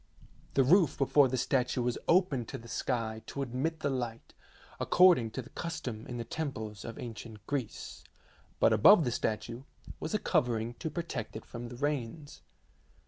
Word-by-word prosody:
The 135 - +5
roof 165 +2 +4
before 140 0 +5
the 130 0 -1
statue 125 0 +1
was 120 0 -1
open 170 -9 +3
to - - -5
the 115 - -12
sky 115 -2 -2
to 140 - -3
admit 140 +6 -2
the 145 - +1
light, 120 -3 -4 0.5
according 175 -11 +5
to 130 - -2
the 135 - -15
custom 125 -10 -5
in 120 - -5
the 120 - -3
temples 110 -9 -5
of 115 - -7
ancient 110 -2 -8
Greece, 135 -5 -4 0.6
but - - +5
above 160 - +7
the 125 - 0
statue 115 +2 -2 0.4
was 160 - -3
a - - +5
covering 120 - 0
to 160 - -3
protect 150 -10 -5
it 110 - -7
from 120 0 -7
the 120 - -8
rains. 145 +1 -3
125 Hz, 170 wpm, -31 LUFS, 115-145 Hz, 0.6 s, above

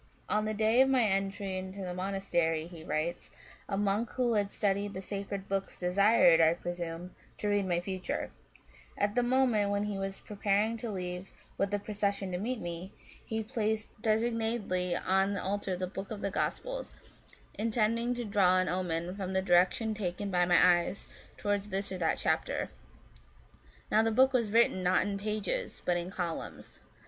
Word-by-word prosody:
"On 210 0 +1
the 215 - -1
day 220 +4 +4
of 265 - +5
my 260 -2 +4
entry 195 -1 -1
into 190 +1 -7
the 180 -1 -4
monastery," 180 -4 0
he 170 -2 -10
writes, 165 +3 -2 0.2
" - - -21
a 195 - -1
monk 205 +3 +1
who 245 -2 +1
had 205 -2 +1
studied 200 0 -1
the - - -3
sacred 195 0 -5
books 195 0 -2
desired, 180 -2 +5
I 160 +1 +5
presume, 175 0 -5 0.2
to 210 - -3
read 205 -2 +1
my 175 -1 +1
future; 185 0 -3 0.7
at 205 0 +1
the 245 - +3
moment 240 -4 +2
when 200 0 0
he 205 -2 -3
was 195 0 -4
preparing 210 +2 0
to 230 +1 -5
leave 180 -1 -4 0.3
with 195 - 0
the 205 - 0
procession 200 -2 -2
to 180 - -2
meet 240 +4 -2
me, 175 +1 -5 0.3
he 220 0 -3
placed 220 -2 -1
designedly 220 -5 0
on 190 +2 +1
the 200 - -3
altar 195 -1 -1
the 185 - -2
book 195 +1 -6
of 210 -2 -6
the 200 - -1
Gospels, - - -2 0.7
intending 230 +2 +1
to 240 -1 -3
draw 195 -3 +4
an 185 0 +2
omen 175 0 -2
from 190 -2 -4
the 190 - +2
direction 185 +5 +3
taken 200 -1 -3
by 180 -1 +3
my 175 0 +6
eyes 185 +3 -5 0.3
to - - -8
wards 205 0 0
this 195 +1 -2
or 185 - -4
that 165 -2 +1
chapter. - - 0 1.2
Now 215 - +5
the 225 - +2
book 260 +4 +4
was 235 -4 +2
written, 230 -4 +4
not 185 0 +3
in 200 -1 -2
pages, 215 - -2
but 175 - +2
in 175 +1 -2
columns. 175 -4 -5
200 Hz, 180 wpm, -31 LUFS, 185-215 Hz, 1.2 s, my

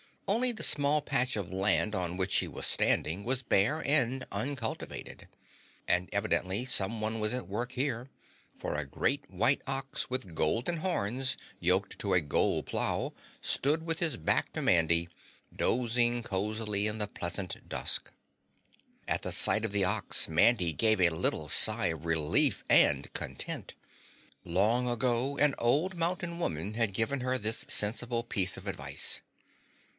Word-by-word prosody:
Only 240 +5 +3
the 220 - -5
small 145 +1 +2
patch 130 -3 0
of 100 -4 -4
land 100 +3 +2
on 90 -3 -2
which 95 +1 -2
she - - +2
was - - -6
standing 85 +6 0
was 130 +1 -1
bare 115 +9 +1
and 135 -3 +1
uncultivated. 130 -5 -4 0.6
And 90 +1 +2
evidently 95 +6 0
someone 110 -1 -1
was 105 +2 +1
at 115 -8 -3
work 120 +5 -4
here, 130 -2 -2 0.5
for - - -4
a 75 -1 -3
great 70 - -1
white - - +2
ox, 135 0 -1
with 125 -9 -3
golden 120 - -1
horns, 130 - -1 0.2
yoked 95 +3 0
to 100 - -1
a 90 - +3
gold 75 - 0
plow - - -1 0.3
stood 150 +4 +1
with 165 -1 -2
his 165 -3 +2
back 80 - +1
to - - -3
Mandy, 85 0 +2 0.5
dozing 120 0 +1
cozily 105 +1 -1
in 105 +1 -2
the 105 -1 0
pleasant 90 0 -5
dusk. - - -1 1.0
At - - -1
sight 110 - +4
of 105 - -5
the 100 -1 +1
ox, 100 -1 +1
Mandy 90 +2 +3
gave 110 +2 +2
a 90 - +5
little 80 -2 0
sigh - - +7
of 80 -1 -4
relief 80 -2 +2
and - - +4
content. - - -4 0.7
Long 110 +8 +1
ago 120 +3 -1
an 150 -1 +4
old 150 +11 +1
mountain 170 0 0
woman 95 - -2
had 115 -3 0
given 115 +7 -1
her 130 +1 0
this 110 0 0
sensible 115 +3 +1
piece 95 -5 -1
of - - -11
advice. - - -2
110 Hz, 150 wpm, -30 LUFS, 95-130 Hz, 1.0 s, sigh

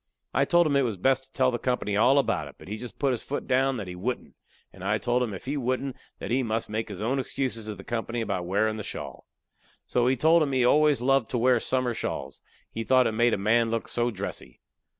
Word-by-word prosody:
I 135 +3 +3
told 175 +3 +4
him 145 -2 +1
it 140 - +4
was 115 -6 -1
best 130 +7 +2
to 130 - -20
tell 130 -1 +2
the 120 - -2
company 115 -5 -1
all 125 +6 +5
about 140 - +1
it, - - -13
but - - -14
he 105 +2 -4
just 120 +2 -9
put 140 -2 +1
his 125 - -2
foot 145 - -4
down 135 +1 +2
that 105 -4 -5
he 90 - -6
wouldn't, 120 +8 -4 0.4
and 95 - -12
I 105 +2 +1
told 120 +3 0
him 120 -3 -1
if 95 - -8
he 140 +3 -2
wouldn't 130 +1 -2 0.2
that - - -6
he 130 +2 +2
must 115 -2 -2
make 110 +1 -2
his 100 -3 -7
own 130 +5 0
excuses 125 -4 -2
to 105 - -4
the 95 - -11
company 120 +1 -3
about 100 -6 -2
wearin' 110 +3 +1
the 105 - -5
shawl. - - -7 0.6
So 125 0 +1
he 130 - +3
told 160 +5 +5
'em 140 -3 0
he 130 -2 +3
always 150 0 +4
loved 135 -2 +2
to 125 - -1
wear 125 +1 +4
summer 130 0 0
shawls; - - -5 0.3
he 115 - -4
thought 130 +3 +4
it - - +1
made 120 +2 +2
a - - -4
man 115 +3 +2
look 115 0 -2
so 120 0 0
dressy. 100 -3 -7
120 Hz, 255 wpm, -27 LUFS, 110-130 Hz, 0.6 s, all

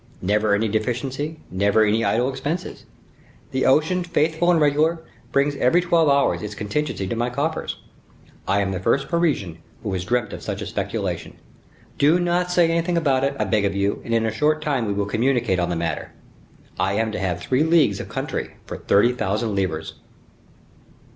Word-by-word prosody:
Never 105 +2 +2
any 110 +2 0
deficiency, 125 +8 -2
never 100 +3 +3
any 110 +2 +1
idle 120 +2 +2
expenses; 140 +6 -4 0.6
the 130 - +1
ocean, 160 +6 +3
faithful 165 0 +1
and 175 -2 +4
regular, 155 +3 +2 0.3
brings 140 +1 +2
every 130 +8 +3
twelve 170 -3 +3
hours 140 0 +2
its 105 -1 -6
contingency 105 +1 -2
to 105 - -3
my 120 +2 0
coffers. 145 +6 -2 0.7
I 100 +1 +2
am 95 -1 -1
the 95 - -3
first 135 +9 +1
Parisian 145 - 0 0.2
who 100 -4 -3
has 90 -1 -2
dreamt 120 +1 -1
of - - -7
such - - -4
a - - -4
speculation. - - -4 0.6
Do 155 +5 +4
not 175 0 +1
say 175 -2 +3
anything 170 +1 0
about 135 -5 +2
it, 140 0 0
I - - +2
beg 105 -2 +1
of 100 -1 0
you, 100 +1 0
and 115 - -6
in 115 -1 +2
a 110 - 0
short 155 +7 +1
time 135 -7 0
we 100 - 0
will 100 0 -1
communicate 115 -2 +1
on 90 0 0
the 85 - -1
matter. 85 0 -3 0.7
I - - +1
am 110 +1 0
to - - -4
have 90 -3 -1
three 130 +10 0
leagues 160 0 +3
of - - -7
country - - -4
for - - -6
thirty 105 +5 +3
thousand 110 -1 -1
livres." 80 -5 -2
125 Hz, 185 wpm, -22 LUFS, 100-155 Hz, 0.7 s, and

